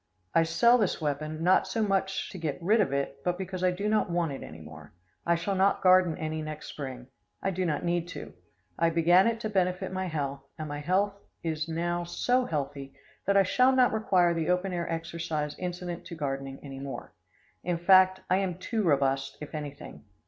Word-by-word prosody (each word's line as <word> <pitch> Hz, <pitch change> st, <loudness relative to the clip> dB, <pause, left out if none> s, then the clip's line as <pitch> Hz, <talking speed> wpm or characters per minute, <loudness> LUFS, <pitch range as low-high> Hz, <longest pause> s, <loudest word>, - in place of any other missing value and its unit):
I 165 Hz, -, +5 dB
sell 235 Hz, +10 st, +4 dB
this 205 Hz, -5 st, +1 dB
weapon, 155 Hz, +1 st, -3 dB
not 185 Hz, +2 st, +4 dB
so 225 Hz, -, 0 dB
much 195 Hz, -1 st, 0 dB
to 185 Hz, -, -8 dB
get 155 Hz, -4 st, -2 dB
rid 210 Hz, +6 st, +3 dB
of 185 Hz, -, 0 dB
it, 140 Hz, 0 st, -2 dB
but 180 Hz, 0 st, 0 dB
because 185 Hz, -1 st, -5 dB
I 185 Hz, -, +5 dB
do 190 Hz, +3 st, -2 dB
not 215 Hz, -2 st, +2 dB
want 170 Hz, -3 st, 0 dB
it 135 Hz, -, -6 dB
any 80 Hz, -, -9 dB
more. 75 Hz, 0 st, -12 dB, 0.3 s
I 170 Hz, -, +4 dB
shall 185 Hz, +4 st, -2 dB
not 195 Hz, +1 st, +2 dB
garden 185 Hz, -3 st, +5 dB
any 155 Hz, 0 st, -3 dB
next 155 Hz, 0 st, -6 dB
spring. 130 Hz, -4 st, -6 dB, 0.4 s
I 195 Hz, -, +1 dB
do 185 Hz, 0 st, -1 dB
not 155 Hz, +2 st, -1 dB
need 175 Hz, 0 st, 0 dB
to. -, -, -8 dB, 0.5 s
I 165 Hz, 0 st, +4 dB
began 170 Hz, +4 st, +5 dB
it 230 Hz, -1 st, 0 dB
to 215 Hz, -, -1 dB
benefit 185 Hz, -1 st, 0 dB
my 185 Hz, 0 st, -2 dB
health, 140 Hz, -4 st, -3 dB, 0.2 s
and 155 Hz, -1 st, -5 dB
my 145 Hz, 0 st, -4 dB
health 190 Hz, +6 st, +1 dB, 0.3 s
is 160 Hz, -1 st, -2 dB
now 175 Hz, +1 st, -1 dB
so 245 Hz, +9 st, +1 dB
healthy 140 Hz, -, -4 dB, 0.3 s
that 200 Hz, 0 st, +4 dB
I 195 Hz, -, +7 dB
shall 255 Hz, +7 st, +3 dB
not 250 Hz, -3 st, +4 dB
require 185 Hz, -6 st, +3 dB
the 165 Hz, -1 st, -1 dB
open 180 Hz, +1 st, +1 dB
air 170 Hz, -1 st, -2 dB
exercise 165 Hz, -2 st, -3 dB
incident 175 Hz, -1 st, -4 dB
to 170 Hz, -, -7 dB
gardening 135 Hz, -3 st, -4 dB
any 135 Hz, -2 st, -8 dB
more. 135 Hz, 0 st, -7 dB, 0.5 s
In 175 Hz, -1 st, 0 dB
fact, 185 Hz, +1 st, +5 dB
I 185 Hz, -, +3 dB
am 190 Hz, -3 st, -1 dB
too 220 Hz, +4 st, -2 dB
robust, 135 Hz, -5 st, +1 dB
if 150 Hz, -, -9 dB
anything. 145 Hz, -2 st, -7 dB
170 Hz, 205 wpm, -28 LUFS, 150-190 Hz, 0.5 s, I